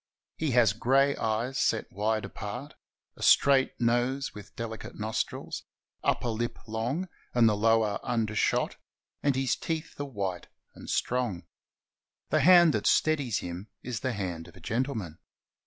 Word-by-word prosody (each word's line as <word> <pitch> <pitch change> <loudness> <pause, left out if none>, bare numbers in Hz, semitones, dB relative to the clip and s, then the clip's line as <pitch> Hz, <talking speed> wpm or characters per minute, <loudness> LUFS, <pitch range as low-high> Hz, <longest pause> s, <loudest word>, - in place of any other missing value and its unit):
He 155 - -1
has 115 -5 +5
gray 135 +5 +3
eyes 115 +4 -1
set - - +1
wide 110 +2 0
apart, 120 +8 -6 0.4
a - - -15
straight 135 -1 +4
nose 120 +3 +1
with 105 -1 -12
deUcate 115 -1 -6
nostrils, 110 +1 -3 0.4
upper 120 - +1
lip 115 +1 -2
long 120 +11 -2 0.3
and 120 -2 +6
the 105 - +3
lower 110 -1 +2
undershot, 110 -4 0 0.4
and 140 -2 +2
his 130 -1 +1
teeth 160 -2 -4
are - - -2
white 100 -9 -4 0.3
and - - -11
strong. 120 -8 -1 0.9
The - - +4
hand 175 -3 +7
that - - 0
steadies 145 -8 +2
him 90 +4 -6 0.2
is 120 -3 -3
the 130 +1 -2
hand 90 -5 -4
of 85 - -15
a - - -12
gentleman. 110 - -3
115 Hz, 145 wpm, -29 LUFS, 105-135 Hz, 0.9 s, hand